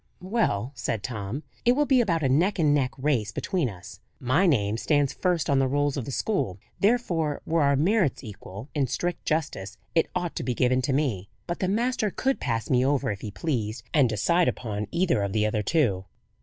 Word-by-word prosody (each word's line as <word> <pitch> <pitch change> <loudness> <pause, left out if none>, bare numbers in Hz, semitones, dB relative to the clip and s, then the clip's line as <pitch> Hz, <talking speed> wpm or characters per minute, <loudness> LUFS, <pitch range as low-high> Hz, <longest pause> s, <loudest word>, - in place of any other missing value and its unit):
"Well," 185 - 0
said 110 -3 -3
Tom, 110 +5 -4 0.2
"it 240 - +5
will 295 +3 +2
be 265 -3 +4
about 170 -8 0
a - - +3
neck 170 +11 +2
and 150 -4 +3
neck 135 -3 +2
race 130 -7 0
between 175 - -1
us. 90 -4 -11 0.2
My 145 +10 +2
name 110 -8 +2
stands 145 +2 +1
first 180 -4 0
on 140 -1 +3
the 135 - +2
rolls 145 +1 +1
of 135 -5 -3
the 140 - -5
school; 125 - -1 0.2
therefore, 175 -9 +1
were 165 0 +1
our 140 -1 +4
merits 170 - +2
equal, 105 0 -9
in 140 -3 +1
strict 175 +6 -3
justice 145 -11 -2 0.2
it 165 - +2
ought 175 -2 -2
to - - -2
be 125 0 -1
given 130 +1 +2
to 130 - -1
me. 120 -10 -1 0.2
But 175 - -4
the 185 - 0
master 225 +2 +1
could 265 +7 -1
pass 115 -3 -2
me 125 -1 +3
over 135 -4 +1
if 100 - -6
he 110 - -5
pleased, 110 -3 -3
and 140 -6 +4
decide 170 - +2
upon 105 -3 -2
either 170 - +1
of 100 -1 -2
the 110 -1 +2
other 110 0 0
two." 105 - +1
140 Hz, 210 wpm, -26 LUFS, 110-170 Hz, 0.2 s, it